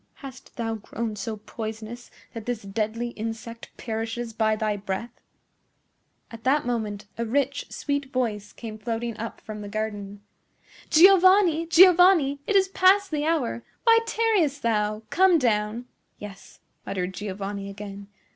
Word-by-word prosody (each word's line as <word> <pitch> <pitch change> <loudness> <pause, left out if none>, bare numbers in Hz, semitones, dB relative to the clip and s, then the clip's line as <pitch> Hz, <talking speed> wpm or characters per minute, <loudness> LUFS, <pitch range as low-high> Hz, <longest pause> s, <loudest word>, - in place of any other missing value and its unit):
"Hast 265 -2 -12
thou 225 -1 -2
grown 220 +1 -5
so 215 +2 -5
poisonous 220 +2 -7 0.2
that 225 -1 -8
this 240 -3 -3
deadly 220 +4 -2
insect 230 0 -7
perishes 225 +1 -4
by 220 -1 +1
thy 215 -1 -1
breath?" 200 +3 -4 1.2
At 230 0 -10
that 280 +2 +2
moment 215 -4 -3
a - - +1
rich, 275 +4 -1
sweet 285 -1 -3
voice 215 -6 -2
came 220 -2 -9
floating 230 +1 -3
up 230 +1 -6
from 215 -1 -8
the 205 - -7
garden. 205 -1 -5 0.7
"Giovanni! 370 -1 +6
Giovanni! 350 -4 +6
It 415 - 0
is 385 -1 +5
past 390 +1 +4
the 300 -1 -1
hour! 290 -8 0 0.2
Why 455 -1 +6
tarriest 405 -12 +1
thou? 215 -1 0
Come 375 -1 +5
down!" 225 -2 0 0.3
"Yes," 205 -1 -11 0.2
muttered 185 -1 -3
Giovanni 200 0 -5
again. 200 0 -9
230 Hz, 135 wpm, -25 LUFS, 210-285 Hz, 1.2 s, Giovanni